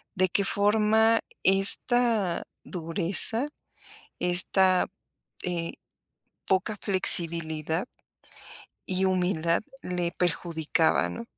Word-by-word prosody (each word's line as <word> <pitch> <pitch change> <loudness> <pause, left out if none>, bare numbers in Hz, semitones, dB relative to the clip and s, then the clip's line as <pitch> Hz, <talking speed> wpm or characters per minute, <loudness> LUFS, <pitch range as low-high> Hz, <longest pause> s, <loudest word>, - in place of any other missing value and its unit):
¿de 185 -1 0
qué 200 - -1
forma 220 +2 +1 0.2
esta 200 0 +2 0.2
dureza, 185 - +1 0.7
esta 185 +1 +2 0.6
eh 170 -2 -4 0.7
poca 190 +3 -1
flexibilidad? 170 -3 +3 1.0
¿Y 190 0 -2
humildad 180 -3 -1 0.2
le 180 -1 -4
perjudicaba, 165 -1 -1
no? 235 - -8
185 Hz, 75 wpm, -25 LUFS, 170-205 Hz, 1.0 s, flexibilidad